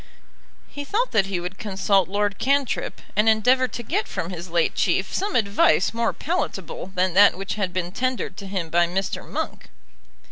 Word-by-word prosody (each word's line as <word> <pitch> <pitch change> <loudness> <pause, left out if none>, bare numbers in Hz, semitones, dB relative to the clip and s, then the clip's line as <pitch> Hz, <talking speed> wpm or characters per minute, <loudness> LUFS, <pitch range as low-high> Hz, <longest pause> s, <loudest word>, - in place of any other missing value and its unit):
He 285 - -7
thought 450 - -1
that 195 -2 +2
he 190 -3 -2
would 180 +2 -6
consult 195 -2 +1
Lord 205 0 -1
Cantrip, 275 0 0
and 210 +2 +4
endeavour 250 +4 +3
to 240 0 -7
get 220 - -1
from 170 - -4
his 175 0 -7
late 170 -1 +1
Chief - - 0
some 400 +2 -1
advice 200 -6 +3
more 230 0 +1
palatable 195 - -4
than 185 0 +1
that 200 -1 +6
which 195 +1 -4
had 200 -4 -2
been 180 -1 -3
tendered 255 +5 -2
to 200 - -7
him 185 -4 -4
by 175 0 +3
Mr. 190 +3 -3
Monk. - - -5
200 Hz, 180 wpm, -23 LUFS, 185-235 Hz, -, that